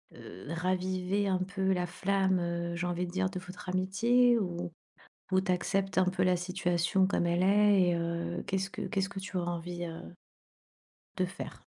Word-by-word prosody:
heu, 90 +9 -11
raviver 185 +3 0
un 190 -1 +1
peu 190 +1 -1
la 180 -1 0
flamme, 190 +1 +1
heu, 170 0 -2
j'ai 175 +1 -2
envie 175 0 -1
de - - -7
dire, 185 0 0
de 185 -1 -5
votre 185 +1 -9
amitié 230 +7 +3
ou 175 -3 -3 0.6
ou 185 - +4
tu 190 0 0
acceptes 195 +2 0
un 185 - +5
peu 185 0 +1
la 185 0 +4
situation 180 0 +1
comme 190 - +1
elle 170 +1 +2
est, 205 0 +5
et 175 - +2
heu, 170 0 -2
qu'est-ce 195 0 -1
que - - -7
qu'est-ce 195 -3 -1
que 200 - -6
tu 190 0 -5
auras 175 -1 -1
envie 175 +1 -5
heu 165 +1 -8 1.0
de 185 - +2
faire? 180 - -8
185 Hz, 190 wpm, -31 LUFS, 175-195 Hz, 1.0 s, un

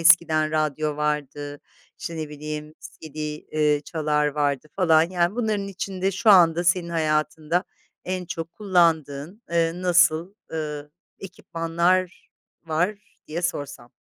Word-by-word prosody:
eskiden 160 -2 +5
radyo 155 -1 0
vardı, 145 -1 -2 0.4
işte, 165 - -5
ne 155 -1 -4
bileyim 150 +1 -6
CD, 155 -2 -12
eee, 150 0 0
çalar 150 -2 0
vardı 145 -1 0
falan, 165 -4 +5
yani, 175 +1 +1
bunların 215 -4 -1
içinde 190 0 -2
şu 215 +4 +3
anda 175 -3 +6
senin 170 0 +2
hayatında 155 +1 0 0.4
en 185 0 -3
çok 165 0 -5
kullandığın, 170 -2 +1
eee, 165 -1 +2
nasıl, 175 0 +3 0.2
ııı, 150 -2 -4 0.3
ekipmanlar 175 0 -1 0.4
var 175 +6 0 0.3
diye 170 +3 -4
sorsam? 145 -8 -4
160 Hz, 120 wpm, -24 LUFS, 150-180 Hz, 0.4 s, anda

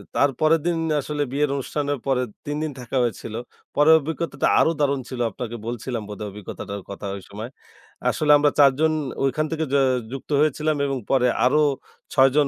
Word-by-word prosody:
তার 140 - +4
পরের 155 +1 +4
দিন 175 -1 +1 0.2
আসলে 145 +1 -2
বিয়ের 145 +1 +1
অনুষ্ঠানের 145 +1 -2
পরে 130 -2 +2 0.2
৩ 145 0 -2
দিন 155 - -2
থাকা 125 +2 -3
হয়েছিল। 115 -2 -3 0.4
পরের 155 +2 +7
অভিজ্ঞতাটা 160 +3 -2
আরো 160 - +4
দারুণ 140 -2 +1
ছিল, 130 - -6
আপনাকে 120 +2 -6
বলছিলাম 120 0 -3
বোধহয় 105 0 -5
অভিজ্ঞতাটার 100 0 -7
কথা 100 +1 -7
ওইসময়। 105 +5 -8 0.6
আসলে 150 -1 +2
আমরা 145 0 +3
৪ 140 -1 +8
জন 160 0 +4 0.3
ঐখান 135 +3 +1
থেকে 160 0 -1
য - - +4 0.4
যুক্ত 135 0 -7
হয়েছিলাম 155 +1 +1
এবং 135 -1 -1
পরে 130 -2 +4 0.2
আরো 150 +4 +4 0.5
৬ 135 0 +6
জন 150 -2 +4
140 Hz, 175 wpm, -23 LUFS, 125-150 Hz, 0.6 s, ৪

